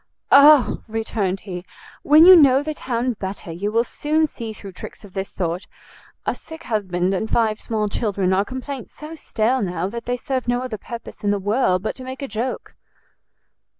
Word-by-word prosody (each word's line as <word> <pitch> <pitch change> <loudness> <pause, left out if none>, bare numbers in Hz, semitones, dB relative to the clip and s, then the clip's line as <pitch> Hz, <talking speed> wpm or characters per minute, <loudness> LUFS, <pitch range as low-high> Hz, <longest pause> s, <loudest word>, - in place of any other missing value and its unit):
"O," 285 -1 +7
returned 215 -4 -2
he, 180 -3 -7 0.4
"when 310 +3 +7
you 370 +1 +11
know 275 -4 +6
the 310 +1 -3
town 250 -3 -2
better 190 -3 -6
you 195 +6 -3
will 230 +2 +3
soon 305 +5 0
see 230 -7 -6
through 200 -2 -10
tricks 185 - -10
of 195 - -15
this 195 0 -4
sort; 175 0 -3 0.6
a - - +1
sick 320 +1 -11
husband 190 - -1
and 220 +3 -2
five 220 -2 +1
small 215 -2 -1
children 200 -3 0
are 190 +1 +3
complaints 260 +1 -7
so 305 +2 -8
stale 255 -4 0
now, 180 -2 -2
that 235 +2 -7
they 245 +1 -1
serve 260 0 -3
no 245 +1 0
other 230 -5 -5
purpose 235 -1 -9
in 205 - +1
the 205 - +2
world 200 -2 +1
but 220 - -2
to 260 - -8
make 260 +2 -7
a - - -3
joke." 245 +2 -4
225 Hz, 190 wpm, -21 LUFS, 195-260 Hz, 0.6 s, you